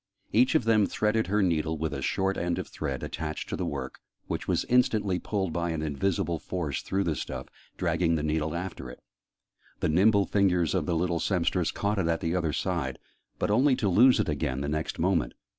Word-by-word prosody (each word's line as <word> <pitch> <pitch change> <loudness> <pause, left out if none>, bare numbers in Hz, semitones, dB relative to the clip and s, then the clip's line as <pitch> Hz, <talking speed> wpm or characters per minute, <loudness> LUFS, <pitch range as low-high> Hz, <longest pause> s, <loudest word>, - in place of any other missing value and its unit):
Each 125 +5 +4
of - - +4
them 110 -3 +3
threaded 110 +1 0
her 105 +1 +2
needle 80 -3 0
with 80 0 -2
a 70 - -4
short 95 +7 0
end 85 0 -1
of - - -4
thread 65 -2 -4
attached 75 -2 -4
to - - -2
the - - -2
work, 65 -2 -5 0.3
which - - -4
was - - +1
instantly 110 -7 +2
pulled 95 -6 -2
by 85 +1 -1
an 80 -2 -2
invisible 85 +2 -1
force 80 -7 -3
through 95 +1 -1
the 80 -4 0
stuff, - - -5 0.3
dragging 85 -2 +1
the 75 - -1
needle 80 +1 -1
after 85 -7 -5
it: 60 - -11 0.8
the - - 0
nimble 100 +5 +4
fingers 90 -5 +2
of 90 -6 0
the 85 - +1
little 85 0 0
sempstress 90 -2 +1
caught 100 0 -1
it 85 - +1
at 85 -1 +1
the 85 +2 -1
other 85 -4 0
side, 75 -8 -2 0.4
but - - 0
only 130 +5 +4
to 110 - -1
lose 120 +7 +6
it 105 - +1
again 70 -3 -1
the 70 - -2
next 75 +1 -2
moment. 90 +1 +1
85 Hz, 210 wpm, -28 LUFS, 80-100 Hz, 0.8 s, lose